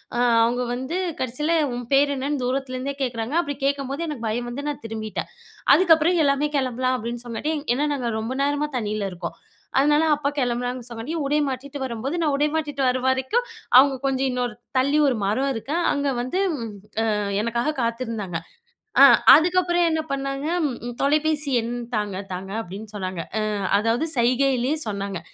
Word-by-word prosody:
அ - - 0 0.2
அவங்க 245 +2 +1
வந்து 260 +8 -3 0.2
கடைசில 295 +7 0 0.2
"உன் 245 0 -5
பேர் 285 +1 +4
என்னன்னு?" 275 0 -2
தூரத்திலேருந்தே 260 +1 -2
கேட்குறாங்க, 240 +2 -3
அப்டி 285 -3 -4
கேட்கும்போது 280 +3 -1
எனக்கு 255 -7 -4
பயம் 240 +2 -2
வந்து 285 +4 -5
நான் 290 - -6
திரும்பிட்டேன். 220 -1 -5 0.4
அதுக்கப்புறம் 335 0 +4
எல்லாமே 280 +1 +2
கிளம்பலாம் 255 -1 0
அப்டின்னு 235 +1 -5
சொன்னனாட்டி, 240 +7 -2 0.2
ஏன்னா 295 +3 +1
நாங்க 250 -4 -2
ரொம்ப 230 +4 -3
நேரமா 290 +1 0
தண்ணீல 210 -3 -2
இருக்கோம். 170 -2 -6 0.4
அதனால 295 +2 +4
அப்பா 290 -1 0
கிளம்புனாங்கன்னு 245 -1 -1
சொன்னங்காட்டியு 245 +8 -4
உடை 295 +2 +1
மாற்றிடிட்டு 275 +2 -6
வரும்போது, 260 +4 -3
நான் 305 -3 +1
உடை 295 +2 +2
மாற்றிடிட்டு 295 -3 -1
வரு 255 +1 +1
வரைக்கும் 260 - +1 0.3
அவங்க 270 +1 +7
கொஞ்சம் 270 0 +1
இன்னோரு 245 -2 -2 0.2
தள்ளி 280 +3 +3
ஒரு 265 - +2
மரம் 260 +8 +1
இருக்கு, 265 +6 -4 0.2
அங்க 285 -1 0
வந்து 255 +10 -2 0.8
அ - - 0 0.3
எனக்காக 235 +6 -1
காத்திருந்தாங்க. 230 -7 -2 0.6
அ - - +12 0.3
அதுக்கப்புறம் 350 +1 +3
என்ன 320 0 +1
பண்ணாங்க? 275 +1 -3 0.2
ம் 240 -1 -6
"தொலைபேசி 300 +1 +1
எண் 235 +1 -4 0.2
தாங்க, 205 -3 -2 0.2
தாங்க" 185 +1 -6
அப்டின்னு 205 +3 -9
சொன்னாங்க. 185 -3 -4 0.2
அ - - 0 0.4
அதாவது 230 +7 +1
சைகைைலேயே 255 +3 +2
சொன்னாங்க. 200 -3 -3
260 Hz, 155 wpm, -23 LUFS, 235-290 Hz, 0.8 s, அ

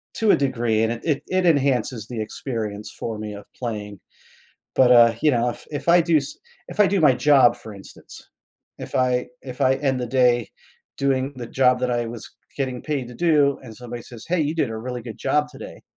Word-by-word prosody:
to 220 -2 +3
a - - +6
degree 120 -5 0
and 115 +1 +1
it 150 -4 0
it 185 -1 0
enhances 130 - +1
the 120 -3 -6
experience 110 -2 -5
for 110 -2 -4
me 105 -1 -6
of 100 - -10
playing. 105 -5 -5 0.8
But, 125 -1 +6
uh, 115 -1 +7
you 150 - +5
know, 120 -1 +1
if - - -11
if 150 +3 -5
I 175 +1 +7
do 165 -1 +2
s 140 -2 -2 0.3
if 210 - -5
I 205 - +7
do 195 -1 +1
my 145 -4 +5
job, 125 -2 +4
for 110 -2 -11
instance, 100 - -14 0.5
if - - -9
I 125 -1 +1 0.2
if 130 +1 -9
I 135 0 +4
end 135 -3 -1
the 125 - -2
day 120 -2 +2 0.5
doing 135 0 0
the 120 -2 -6
job 125 0 +2
that 125 -1 0
I 120 -1 -1
was 115 -1 -8 0.3
getting 130 -3 -3
paid 140 -5 -3
to 125 - -11
do 150 -3 +2
and 115 -4 -11
somebody 120 -1 -8
says, 120 -3 -12
"Hey, 175 -1 +1
you 150 +2 0
did 145 -8 0
a 110 - -5
really 125 +1 -5
good 115 -2 -9
job 150 0 +1
today," 135 - -11
125 Hz, 215 wpm, -22 LUFS, 115-140 Hz, 0.8 s, uh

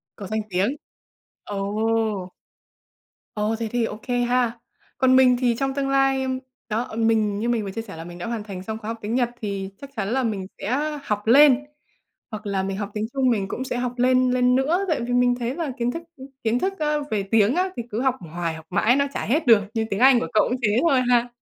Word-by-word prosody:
Có 200 - -8
danh 215 +1 -1
tiếng. 195 +9 0 0.7
Ồ! 210 -1 -1 1.0
Ồ! 210 +1 0
Thế 230 - -2
thì 240 -1 +1
ô 210 -1 -6
kê 245 -1 0
ha! 240 -1 +1 0.4
Còn 260 -1 +4
mình 255 -1 +6
thì 245 -2 +2
trong 270 0 0
tương 275 0 -1
lai, 270 -1 +3
ưm 260 0 -2 0.3
đó, 235 +4 -1
mình 220 -3 +2
như 235 +3 -1
mình 230 -3 +1
vừa 195 - -5
chia 225 +4 -4
sẻ 205 -6 -10
là 165 - -7
mình 175 +1 -10
đã 175 - -6
hoàn 230 -3 -3
thành 190 -3 -7
xong 220 +2 -4
khóa 215 - -9
học 230 +1 -3
tiếng 215 +3 -2
Nhật, 245 -2 +2
thì 200 -2 -3
chắc 280 - -10
chắn 205 -4 -2
là 265 +2 +1
mình 205 -5 -2
sẽ 295 +8 -1
học 210 -3 -3
lên 280 +1 +7 0.7
hoặc 215 -2 -7
là 195 -1 0
mình 195 0 -3
học 205 0 -4
tiếng 215 0 -1
Trung, 265 -2 +2
mình 200 -5 0
cũng 260 - -4
sẽ 255 - -3
học 245 0 -2
lên, 255 0 +3
lên 250 0 +3
nữa, 275 +7 +2
tại 310 -7 +1
vì 240 +1 -3
mình 245 0 +3
thấy 240 +1 -2
là 310 -4 -3
kiến 240 0 0
thức 330 +6 -5 0.4
kiến 225 +2 +2
thức, 390 +6 -2
ơ, 300 -1 0
về 210 -2 0
tiếng 210 +4 +3
á 370 +2 +1
thì 240 - -2
cứ 215 - -2
học 265 -2 +2 0.2
hoài 170 -1 -2
học 160 0 -11
mãi 245 +3 +3
nó 280 0 +2
chả - - -2
hết 295 +7 +1
được, 225 -3 +7
như 225 -1 0
tiếng 200 - -2
Anh 260 -1 +7
của - - -2
cậu 215 - +4
cũng 250 - 0
thế 215 0 +2
thôi 270 -5 +4
ha! 245 0 +3
235 Hz, 245 wpm, -23 LUFS, 210-260 Hz, 1.0 s, lên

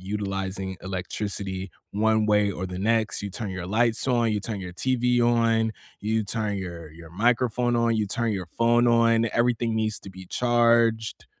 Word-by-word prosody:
utilizing 95 -1 -4
electricity, 95 0 -4 0.2
one 110 +1 +2
way 105 -1 +3
or 95 - -5
the 90 0 -6
next. 110 +1 0
You 100 - -3
turn 105 +1 -5
your 95 -2 -5
lights 115 +4 +1
on, 120 -3 +2
you 105 - -1
turn 105 -2 -4
your 90 -1 -7
TV 125 +4 +1
on, 115 -1 +2 0.3
you 110 +1 0
turn 105 -1 -2
your 85 -4 -7
your 80 0 -13
microphone 120 +4 +1
on, 115 -1 +2
you 105 -1 0
turn 115 +2 -1
your 95 -3 -4
phone 120 +6 +2
on, 115 -1 +4
everything 120 -1 +1
needs 110 -1 -1
to 95 - -10
be 95 0 -11
charged. 115 -1 +2
110 Hz, 175 wpm, -25 LUFS, 95-115 Hz, 0.3 s, on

